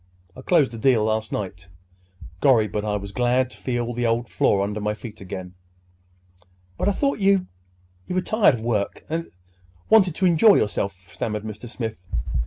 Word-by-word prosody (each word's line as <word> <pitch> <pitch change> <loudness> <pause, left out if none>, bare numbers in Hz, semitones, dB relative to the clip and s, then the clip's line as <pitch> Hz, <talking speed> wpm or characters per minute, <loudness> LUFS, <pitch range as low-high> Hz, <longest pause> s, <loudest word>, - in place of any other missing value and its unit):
Closed 150 -9 +4
the 115 - -8
deal 120 -2 +3
last 110 0 -1
night. 90 -3 -5 0.7
Gorry, 115 -4 +4
but 105 +2 -3
I 105 -1 -1
was 100 0 -7
glad 125 +2 +1
to - - -14
feel 120 -1 -2
the 120 0 0
old 115 0 0
floor 100 +1 +2
under 105 +1 -3
my 105 0 -1
feet 110 -2 -10
again!" 95 -1 -7 1.2
"But 195 - 0
I - - +3
thought 275 +4 0
you—you 90 - -2
were 185 - +2
tired 215 - +4
of 115 - -7
work, 110 -3 -2
and—wanted 90 - -1
to 190 - +1
enjoy 185 +5 +6
yourself," 100 -2 -1
stammered 105 +3 -4
Mr. 110 +2 -8
Smith. 110 -6 -6
110 Hz, 165 wpm, -23 LUFS, 100-130 Hz, 1.2 s, enjoy